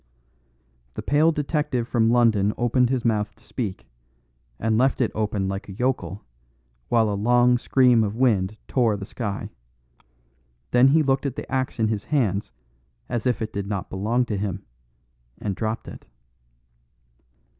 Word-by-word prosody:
The - - -5
pale 155 +3 +3
detective 145 -5 -1
from 115 -2 +2
London 110 -4 +3
opened 120 +1 +2
his 130 -2 -1
mouth 105 -2 0
to - - -25
speak, 100 - -5 0.7
and 110 0 0
left 130 +4 +2
it 120 - +1
open 105 -3 -1
like 95 +1 -5
a - - -7
yokel, 100 -4 -2 0.6
while 115 -2 +3
a 105 - -1
long 120 +4 +3
scream 125 -3 +4
of 105 0 -2
wind 110 -5 +1
tore 115 -5 +2
the 100 - -6
sky; 105 -2 -5 1.2
then 125 +2 +6
he 155 +3 +4
looked 135 0 +1
at 135 - -5
the - - -5
axe 130 -1 -1
in 110 -2 +1
his 105 -2 -2
hands 105 -9 0 0.6
as 120 0 -1
if 120 -2 0
it 110 - -5
did 100 -1 -3
not 100 -3 -4
belong 110 +6 0
to 105 -4 -3
him, 100 -1 -4 0.7
and 100 -3 -3
dropped 110 +2 -3
it. - - -11
115 Hz, 155 wpm, -24 LUFS, 105-125 Hz, 1.2 s, then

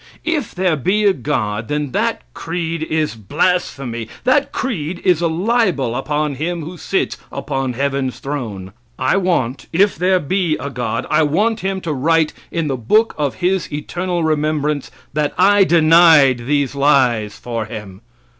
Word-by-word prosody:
If 315 -8 -2
there 180 -3 +1
be 190 +9 +1
a 200 - +5
God, 110 - -2
then 150 0 -2
that - - -1
creed 165 -1 -3
is 160 -1 -1
blasphemy. 135 - -1 0.2
That 270 +3 +2
creed 175 - -3
is 180 -3 +3
a 170 - +2
libel 175 - +1
upon 150 +2 -1
Him 165 +4 -3
who 170 +4 -7
sits 190 +2 -2
upon 135 -2 -3
heaven's 135 0 -1
throne. 110 -10 -5 0.2
I 130 - +1
want 170 -10 -1
if 195 +4 +3
there 185 +2 +2
be 175 0 0
a 140 +2 -5
God 115 -3 -3
I 155 - +4
want 205 +10 +1
Him 190 -1 -2
to 165 -3 -2
write 160 +3 +2 0.2
in 165 -2 -2
the 135 -2 -1
book 215 - +2
of 145 -3 -1
his 185 -1 0
eternal 175 +4 -3
remembrance 150 -2 0 0.2
that 150 0 -1
I 200 +2 +5
denied 160 -7 +5
these 145 -2 +1
lies 130 -7 +2
for 115 -2 -4
Him. 105 -3 -9
155 Hz, 155 wpm, -18 LUFS, 135-180 Hz, 0.2 s, a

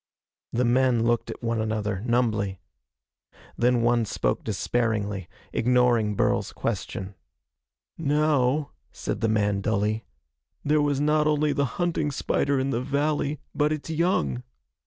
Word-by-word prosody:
The 125 +2 +1
men 125 -1 +3
looked 120 0 +1
at - - -7
one 115 -1 0
another, 105 -3 -2
numbly. 110 -6 +1 1.0
Then 120 0 +2
one 120 0 +3
spoke - - -1
despairingly, 105 -3 -1 0.2
ignoring 120 -3 +3
Burl's - - +1
question. 95 +1 -3 0.9
"Now," 150 -2 +2 0.2
said - - -4
the 115 - +2
man 105 -2 +1
dully, 110 +1 0 0.6
"there 150 +1 +3
was 145 -2 +1
not 150 +1 +2
only 150 -1 +2
the 140 - +1
hunting 170 -4 0
spider 140 0 0
in 135 +1 0
the 120 - 0
valley, 145 +1 -1
but 150 0 +1
its 155 0 -3
young. 155 - +1
125 Hz, 130 wpm, -26 LUFS, 110-145 Hz, 1.0 s, men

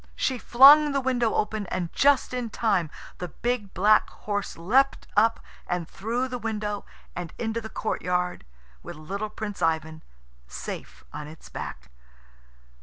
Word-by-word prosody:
She 260 -3 -1
flung 285 +6 +8
the 275 - +2
window 250 -4 +1
open, 215 -2 -1
and 175 -2 -3
just 280 -2 +3
in 245 -2 -2
time 195 -8 +1 0.3
the 180 - -3
big 230 +2 -3
black 210 +3 +4
horse 205 -1 -4
leapt 255 +11 +2
up, 225 +2 +4 0.3
and 175 -2 -2
through 235 +8 -2
the 250 -1 -5
window 210 -2 -3 0.3
and 175 -2 -5
into 230 0 -2
the 220 - -7
courtyard, 180 - -2 0.4
with 175 - -8
little 195 +8 -5
Prince 210 -1 -6
Ivan 160 -1 0 0.5
safe - - -7
on 150 0 -6
its 155 +1 -13
back. 65 0 -7
210 Hz, 145 wpm, -26 LUFS, 180-240 Hz, 0.5 s, flung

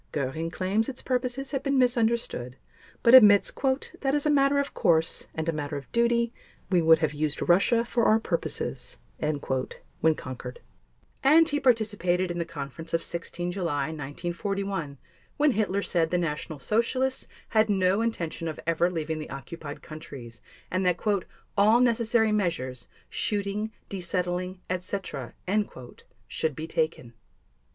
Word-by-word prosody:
Göring 150 +4 -2
claims 195 +6 0
its 260 - -7
purposes 255 +1 -1
have 270 - -1
been 275 -1 +1
misunderstood 235 - +1 0.5
but 235 - +6
admits 210 -6 +8
"that 270 +1 -1
as 295 - 0
a 300 - +4
matter 280 0 +4
of 280 0 -1
course 165 -1 +2
and 160 0 -3
a - - +3
matter 145 -1 -3
of 140 - -10
duty 235 0 +2 0.4
we 180 -2 +4
would 160 0 +6
have 155 -1 0
used 150 0 -1
Russia 215 +7 +4
for 235 -1 +1
our 220 - +5
purposes," 135 - -3 0.2
when 150 +1 -1
conquered. 130 - -7 0.6
And 315 +4 +6
he 290 - 0
participated 205 -8 +2
in 175 - -3
the 170 - -1
conference 165 +1 -5
of 165 - -1
16 175 +1 -4
July 160 -7 -1
1941 170 +2 -4 0.4
when 295 0 +4
Hitler 200 -3 0
said 165 -2 +1
the 180 - +1
National 155 -2 -3
Socialists 245 - 0 0.2
had 220 0 +3
no 190 +1 +2
intention 170 -8 -2
of 155 - -5
ever 170 +1 +2
leaving 160 -2 -3
the 155 - -7
occupied 145 +2 -8
countries, 140 -7 -10 0.3
and 185 +1 0
that 180 -1 +2 0.6
"all 215 +4 +5
necessary 230 -2 +3
measures—shooting, 200 - -2 0.2
desettling, 180 0 -3
etc." 185 +2 -4 0.9
should 155 -3 -2
be 155 - -5
taken. 155 -7 -2
180 Hz, 140 wpm, -27 LUFS, 160-230 Hz, 0.9 s, admits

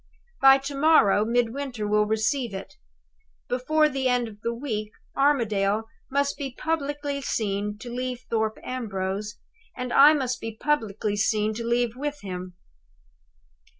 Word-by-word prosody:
"By 270 0 +8
to 275 +1 -6
morrow 275 -9 +5
Midwinter 240 0 -1
will 210 0 +2
receive 220 +1 0
it. 190 0 -7 0.7
Before 305 +5 +2
the 270 -2 -1
end 245 -1 +1
of 210 -2 -12
the 235 - -1
week 225 -4 -4 0.2
Armadale 220 -7 +2 0.3
must 280 +1 0
be 270 -3 -5
publicly 290 -2 -2
seen 210 -4 -2
to 240 +3 -9
leave 250 0 -3
Thorpe 220 -1 0
Ambrose; 210 -4 -3 0.4
and 250 -1 -3
I 290 +3 +8
must 255 -4 -1
be 225 -1 -6
publicly 215 -8 0
seen 210 +1 +1
to 230 +2 -5
leave 235 0 0
with 290 +2 -4
him. 180 -2 -6
240 Hz, 140 wpm, -25 LUFS, 210-275 Hz, 0.7 s, By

